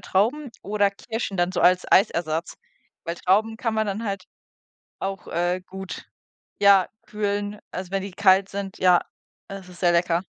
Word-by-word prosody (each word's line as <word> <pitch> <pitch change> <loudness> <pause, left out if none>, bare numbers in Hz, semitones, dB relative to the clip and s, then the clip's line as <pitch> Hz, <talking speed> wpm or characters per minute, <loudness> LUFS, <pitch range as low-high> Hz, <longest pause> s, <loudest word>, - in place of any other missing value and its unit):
Trauben 245 +9 0
oder 205 0 +1
Kirschen 200 0 -5
dann 175 0 +1
so - - -1
als 180 0 +3
Eisersatz, 170 -4 +2 0.5
weil 170 - -3
Trauben 210 +6 +1
kann 230 -1 -2
man 220 0 +1
dann 205 +3 -3
halt 195 -3 -3 0.8
auch, 195 0 -4
äh, 175 +2 0
gut, 190 0 -7 0.5
ja, 200 -2 +6 0.2
kühlen, 205 0 -2
also, 185 0 -6
wenn 195 0 -1
die 200 - -6
kalt 190 0 +4
sind. 195 -1 -5
Ja, 180 -1 +5 0.5
es 195 -2 -9
ist 180 -1 -14
sehr 175 -2 +4
lecker. 170 0 +2
195 Hz, 160 wpm, -24 LUFS, 180-205 Hz, 0.8 s, ja